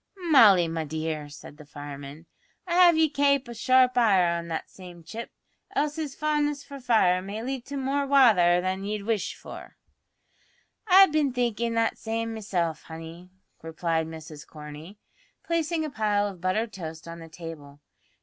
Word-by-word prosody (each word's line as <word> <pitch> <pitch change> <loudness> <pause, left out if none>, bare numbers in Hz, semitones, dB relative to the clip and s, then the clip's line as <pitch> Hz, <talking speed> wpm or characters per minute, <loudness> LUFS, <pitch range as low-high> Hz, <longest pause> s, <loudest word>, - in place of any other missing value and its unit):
"Molly, 200 - +7
my 165 0 -3
dear," 155 -1 -4
said 145 0 -12
the 150 - -13
fireman, 145 +1 -9 0.4
"I'd 350 - -3
have 350 -2 +6
ye 320 0 +4
kape 280 -2 +1
a 240 - -7
sharp 255 +2 +3
eye 185 -7 +3
on 170 0 -5
that 165 -1 -4
same 175 -2 -13
chip, 225 +8 -7 0.5
else 295 +1 0
his 305 -4 -4
fondness 295 -2 -1
for 280 -1 -10
fire 220 -8 +3
may 205 +4 -6
lead 260 -1 -4
to 280 - -5
more 275 +1 -1
wather 215 -11 +5
than 185 +1 -2
ye'd 210 0 -3
wish 220 -1 -2
for." - - -11 1.1
"I've 385 -2 +7
bin 300 -3 +1
thinkin' 235 -2 -1
that 230 0 0
same 225 0 -3
meself, 180 -7 -2
honey," 165 +2 -10 0.3
replied 160 0 -2
Mrs 160 -2 -10
Corney, 150 +5 -11 0.5
placing 335 -1 -1
a 305 - -5
pile 210 -3 +1
of 190 -4 -9
buttered 215 +5 -1
toast 165 -2 -8
on 170 0 -8
the 165 0 -11
table. 160 -4 -10
205 Hz, 165 wpm, -26 LUFS, 165-265 Hz, 1.1 s, Molly